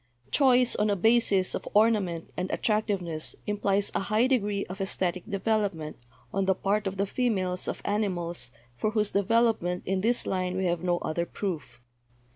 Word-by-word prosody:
"Choice 255 -3 +4
on 210 0 +2
a 205 - +2
basis 205 -2 +3
of - - -4
ornament 205 -6 +2
and 185 +1 -3
attractiveness 195 -7 -1
im 205 0 -2
plies 200 0 +1
a - - +1
high 215 +4 +2
degree 210 -6 0
of 190 +2 -7
esthetic 185 -2 -1
development 200 -6 -1 0.4
on 195 0 +1
the 190 0 +2
part 205 +2 0
of 195 0 -4
the 200 - +1
females 190 -6 -1
of - - -4
animals 175 - -2 0.3
for 215 - 0
whose 215 -1 0
development 200 -3 +1
in 190 0 0
this 235 +4 +2
line 185 -1 -1
we 190 - 0
have 170 -2 0
no 175 -1 +1
(other) 170 +2 -2
proof. 150 -11 -5
195 Hz, 170 wpm, -28 LUFS, 180-215 Hz, 0.4 s, Choice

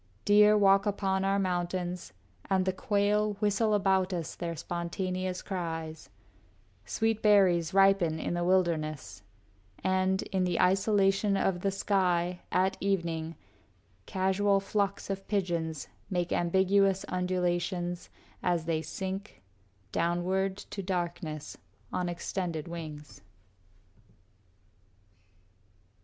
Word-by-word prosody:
Deer 210 +1 +6
walk 195 0 +4
upon 195 -1 0
our 195 +1 +2
mountains, 180 -1 -2 0.4
and 190 -1 +2
the 190 - +1
quail 205 +2 +1
Whistle 210 +1 +1
about 190 -2 +2
us 170 -3 -3
their 170 -1 -4
spontaneous 180 +2 -3
cries; 165 -4 -5 0.8
Sweet 220 - 0
berries 185 -5 +4
ripen 195 -4 +4
in - - -2
the 175 0 -1
wilderness; 170 - 0 0.6
And, 190 0 +1
in 190 -1 +2
the 180 -1 0
isolation 195 +1 +3
of 190 -2 +1
the 195 - +1
sky, 180 -3 +1
At 190 +1 +2
evening, 170 -4 -1 0.7
casual 195 +1 +2
flocks 200 0 -1
of 195 0 -5
pigeons 170 -7 -1 0.2
make 175 -3 -1
Ambiguous 190 +2 +2
undulations 180 -1 -1 0.3
as 175 -3 0
they 160 -1 0
sink, 190 - -6 0.5
Downward 185 +3 0
to 205 0 -7
darkness, 175 -4 -4 0.3
on 180 -1 -1
extended 175 -2 -3
wings. 155 -3 -8
185 Hz, 105 wpm, -30 LUFS, 175-195 Hz, 0.8 s, Deer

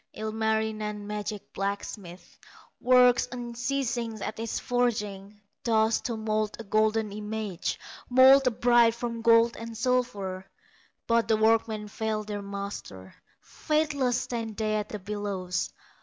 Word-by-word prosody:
Ilmarinen, 220 -1 -2
magic 210 0 -5
blacksmith, 195 -2 -5 0.4
Works 250 0 +5
unceasing 240 -1 -3
at 220 - -5
his 225 -1 -2
forging, 210 -5 -2 0.2
Thus 220 -1 +2
to 235 -2 -3
mould 215 -1 -1
a - - -5
golden 215 0 +1
image, 210 -3 -4 0.3
Mould 260 +1 +7
a - - +7
bride 240 -1 +4
from 235 -1 -4
gold 230 0 +5
and 230 0 -7
silver; 205 -7 -1 0.6
But 230 0 +2
the 220 - +3
workmen 220 -1 +2
fail 215 +1 -2
their 205 -1 -5
master, 200 - -7 0.3
Faithless 295 -5 0
stand 225 -3 -4
they 215 -1 0
at 210 0 -3
the 210 - -4
bellows. 200 -3 -3
220 Hz, 125 wpm, -27 LUFS, 210-235 Hz, 0.6 s, Mould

